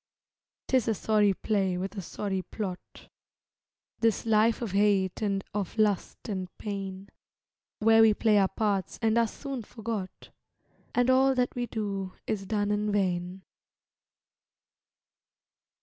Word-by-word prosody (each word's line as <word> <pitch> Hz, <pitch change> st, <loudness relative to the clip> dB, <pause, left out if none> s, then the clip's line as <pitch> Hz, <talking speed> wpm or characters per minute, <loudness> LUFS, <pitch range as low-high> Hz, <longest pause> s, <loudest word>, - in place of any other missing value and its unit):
'Tis 255 Hz, -3 st, +2 dB
a 225 Hz, -, +2 dB
sorry 210 Hz, -1 st, +3 dB
play 195 Hz, -2 st, 0 dB
with 190 Hz, +3 st, -4 dB
a 195 Hz, -, -4 dB
sorry 190 Hz, +2 st, -3 dB
plot, 185 Hz, -1 st, -7 dB, 0.9 s
This 225 Hz, -2 st, +1 dB
life 220 Hz, 0 st, +3 dB
of 220 Hz, -, -3 dB
hate 195 Hz, -1 st, +2 dB
and 200 Hz, -2 st, 0 dB
of 205 Hz, 0 st, -3 dB
lust 210 Hz, -3 st, 0 dB
and 190 Hz, -4 st, -3 dB
pain, 195 Hz, -1 st, -5 dB, 0.7 s
Where 225 Hz, +1 st, +5 dB
we 220 Hz, -1 st, +6 dB
play 215 Hz, -2 st, +3 dB
our 195 Hz, -, +4 dB
parts 200 Hz, -3 st, -1 dB
and 220 Hz, 0 st, +3 dB
are 230 Hz, -, +3 dB
soon 270 Hz, +2 st, -6 dB
forgot, 220 Hz, -3 st, -6 dB, 0.6 s
And 245 Hz, +1 st, +4 dB
all 265 Hz, +1 st, +4 dB
that 250 Hz, -1 st, +1 dB
we 245 Hz, -1 st, -3 dB
do 195 Hz, -4 st, -3 dB
is 195 Hz, -3 st, -3 dB
done 205 Hz, -1 st, 0 dB
in 210 Hz, 0 st, 0 dB
vain. 185 Hz, -2 st, -1 dB
205 Hz, 135 wpm, -28 LUFS, 195-225 Hz, 0.9 s, we